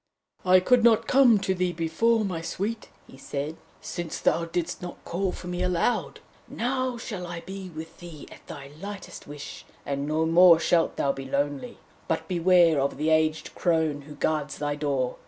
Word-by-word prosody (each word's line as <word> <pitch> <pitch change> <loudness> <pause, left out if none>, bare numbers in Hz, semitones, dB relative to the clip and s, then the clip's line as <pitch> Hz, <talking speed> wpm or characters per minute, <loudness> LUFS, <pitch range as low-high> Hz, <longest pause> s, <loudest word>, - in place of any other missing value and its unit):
'I 185 0 +5
could 245 +5 +4
not 230 -2 +5
come 255 -4 +5
to 190 - 0
thee 180 -1 -1
before, 210 +8 +1
my 175 -4 -3
Sweet,' 210 +6 -4 0.3
said 140 +1 -4 0.3
he, - - -26
'since 170 -2 -5
thou 170 - +1
didst 170 +1 -3
not 175 -1 -7
call 185 +2 -1
for - - -9
me 180 0 -3
aloud. 180 +5 0 0.3
Now 255 +1 -2
shall 200 -6 -6
I 170 -1 -6
be 190 0 -8
with 160 -1 -9
thee 170 -4 -10
at - - -15
thy 140 -1 -9
lightest 200 -1 -8
wish, 145 0 -8 0.2
and 140 0 -2
no 155 +1 +1
more 170 0 +7
shalt 165 0 +2
thou 140 - +1
be 135 -1 -7
lonely. 145 - -2 0.3
But - - -2
beware 175 -4 +4
of 140 0 -1
the 155 +2 0
aged 155 0 +1
crone 160 -4 0
who 150 +1 -11
guards 150 0 -1
thy 145 0 -1
door! 140 -4 -1
170 Hz, 180 wpm, -26 LUFS, 150-190 Hz, 0.3 s, more